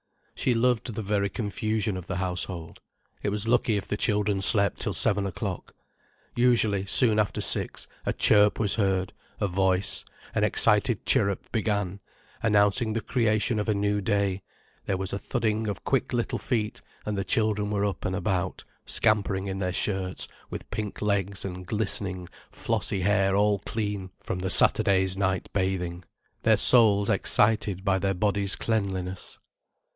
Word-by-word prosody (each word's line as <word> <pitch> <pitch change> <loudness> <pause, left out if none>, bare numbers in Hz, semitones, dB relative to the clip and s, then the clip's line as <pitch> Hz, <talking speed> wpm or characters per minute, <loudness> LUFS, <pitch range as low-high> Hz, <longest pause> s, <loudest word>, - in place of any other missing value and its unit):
She 125 - 0
loved 120 -1 0
the 110 - -4
very 100 0 0
confusion 110 0 -2
of 90 -1 -8
the 100 - -4
household. 90 -2 -4 0.4
It - - -1
was 105 +2 -2
lucky 115 -2 +2
if 100 - -5
the - - -2
children 105 -2 0
slept 100 -1 +4
till - - -1
seven 100 -2 +2
o'clock. 90 - -6 0.6
Usually, 110 -5 +2
soon 110 +1 +6
after 105 - -1
six, - - 0 0.2
a - - +2
chirp 105 -1 +4
was 105 -3 +2
heard, 95 -3 -1 0.3
a 100 - 0
voice, 95 0 +1 0.3
an - - 0
excited - - +2
chirrup 100 -1 +1
began, 100 -4 -2 0.4
announcing 105 +1 +2
the 115 - -2
creation 110 -2 0
of 105 - -3
a 105 - +2
new 105 0 0
day, 100 -1 -1 0.5
there 95 - 0
was 95 0 -4
a 100 - -3
thudding 110 -2 -2
of 100 -2 -5
quick 135 - -1
little 120 -2 -2
feet, 110 -4 -3 0.2
and 105 - -3
the 95 - -2
children 105 -1 0
were 100 -1 -1
up 100 -3 -4
and 95 - -2
about, 95 -2 -2 0.2
scampering 100 -3 +1
in 95 -1 -4
their 90 -1 -1
shirts, 95 -1 -1 0.2
with - - -8
pink 105 -1 -5
legs 100 -2 -1
and 90 -1 -7
glistening, 100 -4 -1 0.2
flossy 100 -3 -2
hair 95 0 +2
all 105 0 +2
clean 105 -2 -4
from 90 - -5
the 95 +1 -3
Saturday's 95 -2 +4
night 95 -1 -1
bathing, 90 -2 -2 0.4
their - - +3
souls 105 -5 +6
excited 105 -3 +1
by 95 -1 +2
their 95 0 -1
bodies' 100 0 0
cleanliness. 95 -4 -3
100 Hz, 160 wpm, -26 LUFS, 95-110 Hz, 0.6 s, soon